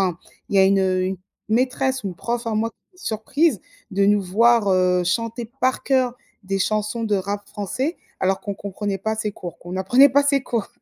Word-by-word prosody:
enfin 170 - -11 0.3
il 200 - 0
y - - +6
a 190 - +7
une 195 0 +4
une, 185 0 +1
heu, - - -17 0.3
maîtresse, 260 +2 +1
une 190 -3 -4
prof 235 +5 -3
à 220 - -1
moi 225 +2 0 0.3
surprise 255 - 0 0.3
de 200 +1 +2
nous 205 0 +4
voir, 225 +3 +3
heu, 180 -1 +3
chanter 230 +5 -1 0.2
par 255 +1 +1
cœur 255 -2 +1 0.3
des 195 +1 -2
chansons 215 +3 -1
de 210 -2 +1
rap 200 +1 -2
français 255 - -3 0.2
alors 190 0 +1
qu'on 200 -1 -4
comprenait 200 0 -4
pas 220 +3 -1
ses 215 -1 -2
cours, 175 -3 -9
qu'on 175 +1 -9
n'apprenait 245 +10 +5
pas 285 +1 +4
ses 280 -2 +2
cours. 230 -6 -2
210 Hz, 200 wpm, -22 LUFS, 190-240 Hz, 0.3 s, a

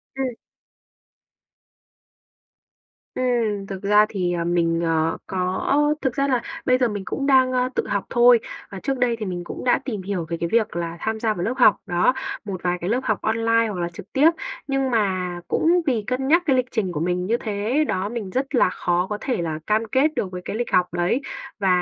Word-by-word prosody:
Ừm. 265 -2 -2 2.8
Ừm, 230 -6 0
thực 195 -1 -6
ra 210 +1 +5
thì, 180 -3 -1
ờ, 170 -1 -1
mình, 170 -1 +1
ờ, 165 0 +1
có 185 0 -2 0.4
thực 265 -3 0
ra 275 0 +1
là 255 -3 +1 0.2
bây 255 0 +4
giờ 250 -2 +2
mình 205 -3 -4
cũng 275 - -3
đang, 260 -2 +5
ơ, 255 0 +1
tự - - -1
học 200 -2 -1
thôi. 240 -1 +6 0.3
Và 195 - -6
trước 270 +8 -2
đây 245 -2 +2
thì 215 - -3
mình 175 -2 -4
cũng - - -7
đã 250 - +3
tìm 215 -7 -3
hiểu 185 -3 -3
về 170 - -2
cái 170 - -2
việc 225 -3 +1
là 170 -1 -3
tham 220 0 -2
gia 220 -1 +1
vào 175 - -4
lớp 255 - 0
học, - - +6
đó, 180 +5 +2 0.3
một 190 -3 -5
vài 180 0 0
cái 180 - -2
lớp 245 +3 +2
học 215 -4 -1
online 230 +1 +2
hoặc 200 -4 -4
là 170 - -1
trực 185 - -11
tiếp. 290 +4 +6 0.4
Nhưng 270 -1 0
mà 185 -5 0
cũng 345 +2 +3
vì 235 -5 +1
cân 255 +1 -1
nhắc 340 +4 +4
cái 270 -4 +3
lịch 255 -1 +2
trình 205 -6 -1
của 150 - -3
mình 180 +2 -1
như 230 +5 +1
thế 220 +8 0
đó, 190 +2 -1
mình 225 -5 -5
rất 265 +6 -2
là 235 - +4
khó 180 0 0
có 210 - -2
thể 250 -9 -1
là 160 -2 -3
cam 215 +1 +2
kết 290 +4 +3
được 190 -6 -2
với 180 - -6
cái - - -4
lịch 240 +1 -3
học 180 -1 +2
đấy. 175 +10 +1 0.4
Và, 195 - 0
210 Hz, 220 wpm, -23 LUFS, 180-250 Hz, 2.8 s, thôi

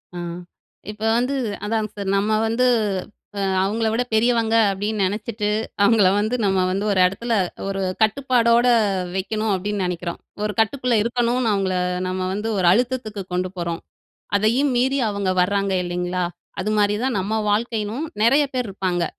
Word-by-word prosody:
ஆ - - -5 0.7
இப்ப 210 0 -15 0.2
வந்து 250 +3 0 0.3
அதாங்க 215 0 -1
சார், 200 -1 -3
நம்ம 205 +2 0 0.2
வந்து 230 +3 +1 1.0
அவங்கள 220 +3 0
விட 235 +3 +1
பெரியவங்க 230 0 +2 0.2
அப்டின்னு 205 +2 -2
நெனச்சிட்டு, 210 +2 -2 0.4
அவங்கள 205 -2 +5
வந்து 215 +4 0
நம்ம 190 -1 +2
வந்து 195 +2 -1
ஒரு 195 - +1
இடத்துல, 230 +6 -1 0.3
ஒரு 195 0 -2 0.2
கட்டுப்பாடோட 235 +1 +3 0.5
வெக்கணும் 215 +3 -1
அப்டின்னு 200 +1 -2
நெனைக்குறோம். 175 -1 -4 0.2
ஒரு 210 0 -1
கட்டுக்குள்ள 245 +2 +1
இருக்கணும்னு 240 +1 0
அவங்கள 195 -2 0 0.3
நம்ம 185 0 -3
வந்து 210 +3 -3
ஒரு 185 - +1
அழுத்தத்துக்கு 235 -1 0
கொண்டு 180 +1 -1
போறோம். 170 -1 -3 0.6
அதையும் 240 +7 +2
மீறி 265 +3 +2
அவங்க 200 -2 -1
வராங்க 200 +1 0
இல்லிங்களா, 180 0 -2 0.4
அதுமாரி 210 +1 +1
தான் 260 -3 0
நம்ம 205 +4 -1
வாழ்க்கையும் 220 +4 -1 0.2
நெறய 270 +6 +5
பேர் 250 -3 -1
இருப்பாங்க. 185 -3 -1
210 Hz, 140 wpm, -22 LUFS, 195-235 Hz, 1.0 s, அவங்கள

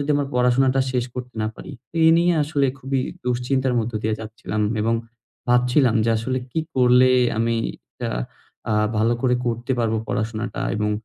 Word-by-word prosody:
যদি 145 +1 -2
আমার 145 -1 -1
পড়াশোনাটা 130 +2 +3
শেষ 125 -2 0
করতে 125 -1 -7
না 110 - 0
পারি। 170 - -9 0.3
এ - - +5
নিয়ে 175 +1 +3
আসলে 145 -2 +1
খুবই 135 0 -1 0.2
দুশ্চিন্তার 125 +1 0
মধ্য 115 +1 -2
দিয়ে 110 0 0
যাচ্ছিলাম 110 -1 -4 0.2
এবং 115 +2 +1 0.5
ভাবছিলাম 125 0 +3
যে 115 - +2
আসলে 130 +4 -1
কি 160 - -1
করলে 125 0 +5 0.3
আমি 115 0 +1 0.4
তা - - -2 0.6
আ - - +2 0.2
ভালো 115 +2 +2
করে 125 -1 +3
করতে 120 +2 -1
পারবো 115 -1 +1
পড়াশোনাটা 110 +1 -3 0.2
এবং 105 0 0
125 Hz, 165 wpm, -22 LUFS, 115-130 Hz, 0.6 s, এ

